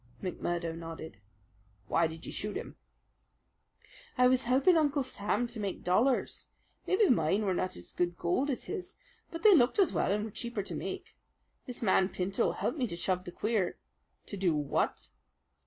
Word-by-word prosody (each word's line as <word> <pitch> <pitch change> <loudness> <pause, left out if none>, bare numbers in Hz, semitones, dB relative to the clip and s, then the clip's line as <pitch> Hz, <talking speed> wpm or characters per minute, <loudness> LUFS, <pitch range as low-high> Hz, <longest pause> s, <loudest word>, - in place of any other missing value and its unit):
McMurdo 175 -2 -2
nodded. 165 -8 -8 0.7
"Why 165 - +3
did 160 +1 -9
you - - -6
shoot 210 0 -3
him?" - - -7 1.4
"I 250 - +5
was 255 0 +3
helping 265 +9 +4
Uncle 290 -3 +2
Sam 215 -1 -1
to 235 -1 -6
make 200 -3 -3
dollars. 235 +9 +1 0.4
Maybe 385 +2 +4
mine 210 - +2
were 190 - +2
not 185 +1 -1
as - - -7
good 175 0 -1
gold 215 +12 0
as 265 - -1
his, 390 -1 -6 0.3
but 330 +2 -7
they 425 -2 +9
looked 255 -7 +4
as 395 -3 +4
well - - +1
and 210 +1 0
were 220 - -7
cheaper 235 -2 -3
to - - -6
make. - - -5 0.5
This 245 -1 -5
man 190 -2 +4
Pinto 190 +1 0
helped 295 - -2
me 250 - +1
to 170 - -5
shove 185 +1 -1
the 175 - -6
queer 210 -2 -1 0.2
" - - -45
"To - - -6
do 180 -4 +2
what?" 145 - -1
205 Hz, 180 wpm, -31 LUFS, 180-255 Hz, 1.4 s, they